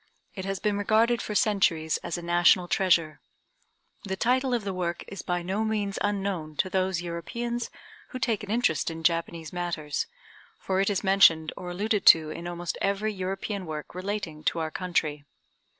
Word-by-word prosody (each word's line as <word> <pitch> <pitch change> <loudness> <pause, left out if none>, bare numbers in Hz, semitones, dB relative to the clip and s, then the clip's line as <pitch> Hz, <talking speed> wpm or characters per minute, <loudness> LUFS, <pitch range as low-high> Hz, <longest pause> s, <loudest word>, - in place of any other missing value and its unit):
It 190 -2 -6
has 195 0 -2
been 205 -1 0
regarded 225 +3 +3
for 210 - -4
centuries 190 -9 +2
as 170 - -4
a 175 - -7
national 175 +1 +4
treasure. 170 -5 +2 0.8
The 190 -2 -3
title 255 +6 +1
of 240 -3 0
the 195 -1 -3
work 175 -2 -2
is 195 - -7
by 175 -1 -2
no 195 +5 -1
means 210 -2 -1
unknown 195 -6 -2
to 185 - 0
those 185 -2 0
Europeans 235 +8 -4 0.4
who 255 - -5
take 235 -5 0
an 205 - -8
interest 210 - +1
in 165 0 -7
Japanese 165 -1 0
matters, 165 -6 -2 0.5
for 190 0 0
it 195 - +2
is 200 -1 -1
mentioned 180 -5 +5
or 180 - -7
alluded 205 +3 -1
to 155 -1 +8
in 170 +2 -6
almost 175 0 -4
every 200 +2 0
European 190 0 -4
work 155 -1 -6
relating 185 -4 -4
to - - +1
our 160 -1 -2
country. 155 -5 -1
185 Hz, 175 wpm, -27 LUFS, 170-205 Hz, 0.8 s, to